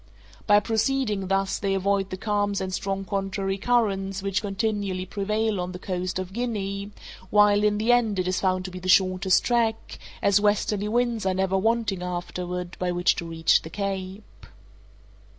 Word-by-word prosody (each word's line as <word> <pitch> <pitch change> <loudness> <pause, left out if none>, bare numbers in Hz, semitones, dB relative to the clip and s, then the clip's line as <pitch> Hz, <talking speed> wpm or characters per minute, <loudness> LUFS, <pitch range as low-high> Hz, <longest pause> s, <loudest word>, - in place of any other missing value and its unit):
By 205 -1 +6
proceeding 220 -2 0
thus 195 0 0
they 195 -1 0
avoid 195 0 0
the 185 - -5
calms 205 -1 0
and 190 -1 -4
strong 195 +1 -2
contrary 195 0 -2
currents 195 -5 0
which 195 0 0
continually 200 -2 -2
prevail 210 +1 -1
on 180 +1 -4
the - - -5
coast 185 0 -3
of 185 0 -5
Guinea, 200 -4 -3 0.4
while, 205 0 +5
in 210 0 +2
the 220 +3 +2
end, 230 -4 +2
it 180 -1 0
is 185 - 0
found 185 -1 0
to 185 - -5
be 185 - -7
the 185 +1 -5
shortest 185 0 +4
track, 230 -2 0 0.2
as 200 0 +4
westerly 205 0 +1
winds 235 0 0
are 185 - +1
never 190 0 0
wanting 220 -1 0
afterward 180 0 -4
by 180 -1 0
which 175 +1 +2
to 175 - -4
reach 165 -1 +2
the 160 - -9
Cape. 195 +1 -6
195 Hz, 170 wpm, -25 LUFS, 185-210 Hz, 0.4 s, By